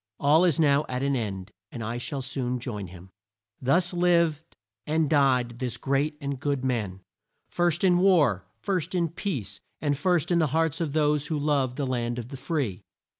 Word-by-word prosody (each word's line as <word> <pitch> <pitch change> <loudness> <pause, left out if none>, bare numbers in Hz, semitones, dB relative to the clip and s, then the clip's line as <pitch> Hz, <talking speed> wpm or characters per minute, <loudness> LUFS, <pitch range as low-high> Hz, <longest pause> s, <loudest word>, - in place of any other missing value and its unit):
"All 155 +5 +5
is 165 -5 +2
now 145 -2 +4
at 125 +1 -2
an 140 0 +1
end, 100 -5 -4 0.2
and 120 - -6
I 115 +2 -3
shall 135 +2 -4
soon 130 -1 -2
join 105 -6 -5
him." 90 +1 -13 0.5
Thus 170 +8 +2
lived 170 -3 +1 0.3
and 155 0 +2
died 130 -5 +2
this 125 -3 -3
great 140 +4 0
and 140 -3 -4
good 140 -2 -1
man, 105 -7 -2 0.5
"first 175 0 +1
in 180 -2 +4
war, 145 - +3
first 180 - -2
in 170 -2 +1
peace, 135 - -4 0.2
and 145 -2 0
first 175 +2 +1
in 170 - +4
the 160 - +3
hearts 165 0 +1
of" 155 -4 -2
those 150 -1 +2
who 155 - -1
love 140 -4 0
"the 140 - -2
land 120 -2 -2
of 120 0 -6
the 135 - -7
free." 130 - -2
140 Hz, 185 wpm, -26 LUFS, 125-160 Hz, 0.5 s, All